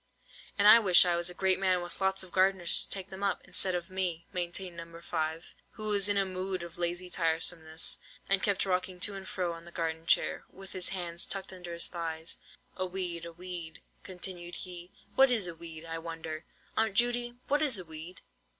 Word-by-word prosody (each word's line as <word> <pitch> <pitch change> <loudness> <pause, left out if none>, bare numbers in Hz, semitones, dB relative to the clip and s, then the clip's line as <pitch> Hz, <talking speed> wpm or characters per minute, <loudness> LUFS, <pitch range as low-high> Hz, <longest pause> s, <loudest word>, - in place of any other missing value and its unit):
"And 205 0 +5
I 220 +2 +11
wish 185 -5 +7
I 175 -1 +2
was 170 +1 +1
a - - -6
great 190 0 +2
man, 185 -2 +3
with 175 - -10
lots 190 0 +2
of 185 - -13
gardeners 185 -2 +4
to - - -14
take 195 0 -5
them 190 +1 -8
up, 200 -1 -1
instead 185 -1 +4
of 175 +1 -4
me," 180 -3 -2
maintained 175 0 -2
No. 165 0 -9
5, 160 -1 -3 0.2
who 215 -1 -5
was 205 -1 +3
in 205 - +2
a 195 - +3
mood 185 -1 -3
of 170 +1 -10
lazy 175 +1 -1
tiresomeness, 160 -1 +1 0.3
and 195 -1 +3
kept 200 -1 +1
rocking 185 -1 -1
to 210 - +5
and 195 -1 -7
fro 180 -2 -2
on 165 0 -10
the 175 - -11
garden 165 -1 -3
chair, - - +2
with 195 0 -12
his 185 -1 +2
hands 175 -2 -1
tucked 195 -1 -4
under 180 -2 -8
his 170 0 +3
thighs. 165 -1 -4 0.4
"A 185 - -1
weed—a 175 -2 -5
weed," 175 -2 -8 0.2
continued 180 -2 -6
he; 180 -1 -8 0.2
"what 270 0 +6
is 225 -7 +3
a 170 - -4
weed, 165 -1 -9
I 165 0 -4
wonder? 165 -1 -6 0.3
Aunt 220 -3 +1
Judy, 240 +1 +2
what 290 +2 +2
is 280 -8 +4
a 185 - -4
weed?" 160 +3 -9
180 Hz, 205 wpm, -31 LUFS, 170-190 Hz, 0.4 s, I